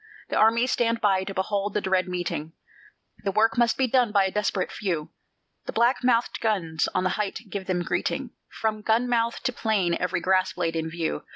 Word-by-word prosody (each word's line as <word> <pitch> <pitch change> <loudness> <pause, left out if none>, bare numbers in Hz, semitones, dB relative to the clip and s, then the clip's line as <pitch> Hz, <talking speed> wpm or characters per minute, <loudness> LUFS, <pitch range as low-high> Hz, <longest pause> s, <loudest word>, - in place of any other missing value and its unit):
The - - -2
armies 230 +3 +4
stand 230 -1 +1
by 195 -3 +2
to 195 - -5
behold 200 +1 -1
the - - +3
dread 190 -2 +1
meeting; 175 -3 -3 0.7
The 200 - 0
work 220 +3 +3
must 235 -1 +2
be 265 - +3
done 250 -2 +2
by 200 -2 +4
a 190 - -1
desperate 210 -2 -1
few; 170 -7 -3 0.6
The - - -4
black 235 +3 +2
mouthèd 245 -2 +1
guns 170 -8 0
on 185 - +2
the 185 - +1
height 210 +2 -4
give 195 -2 -5
them 180 -2 0
greeting 260 +7 -2 0.2
From 215 -1 -2
gun 225 +3 +2
mouth 235 -1 0
to 255 - 0
plain 210 -7 +1
every 180 0 0
grass 185 0 +2
blade 165 -2 -2
in 160 0 -2
view. 165 -1 -3
205 Hz, 200 wpm, -25 LUFS, 185-230 Hz, 0.7 s, armies